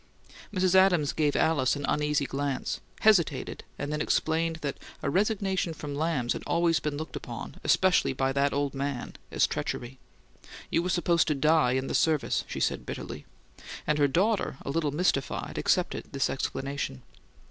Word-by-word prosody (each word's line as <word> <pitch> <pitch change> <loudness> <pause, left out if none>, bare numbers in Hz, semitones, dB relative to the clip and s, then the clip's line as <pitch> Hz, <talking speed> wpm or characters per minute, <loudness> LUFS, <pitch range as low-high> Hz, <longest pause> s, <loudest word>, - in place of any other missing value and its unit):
Mrs. 185 -2 +2
Adams 185 -6 +4
gave 150 -2 +1
Alice 145 -5 +2
an 145 0 -3
uneasy 150 -1 +1
glance, 140 0 -2 0.2
hesitated, 175 -10 +2
and 145 +1 -3
then 150 - -1
explained 165 +2 +1
that 140 -2 -3 0.2
a - - 0
resignation 190 -3 0
from 145 -1 -6
Lamb's 145 -5 0
had - - -5
always 170 -1 +2
been 150 -1 -3
looked 155 -3 -6
upon, - - -7
especially 185 -7 +3
by 135 0 0
"that 140 +1 +2
old 145 -1 -1
man," 140 -2 -3 0.2
as - - +3
treachery. 125 +2 -4 0.7
You 165 - +3
were 180 - -2
supposed 170 -1 +2
to 150 - +1
die 150 -2 +3
in 130 0 0
the - - -4
service, 155 -3 +2
she - - -5
said - - 0
bitterly, - - -7 0.6
and 150 0 +1
her 145 - +5
daughter, 190 - +1
a - - -2
little 155 -1 0
mystified, 145 -2 -1
accepted - - 0
this - - +1
explanation. 135 -2 -3
150 Hz, 165 wpm, -28 LUFS, 140-170 Hz, 0.7 s, her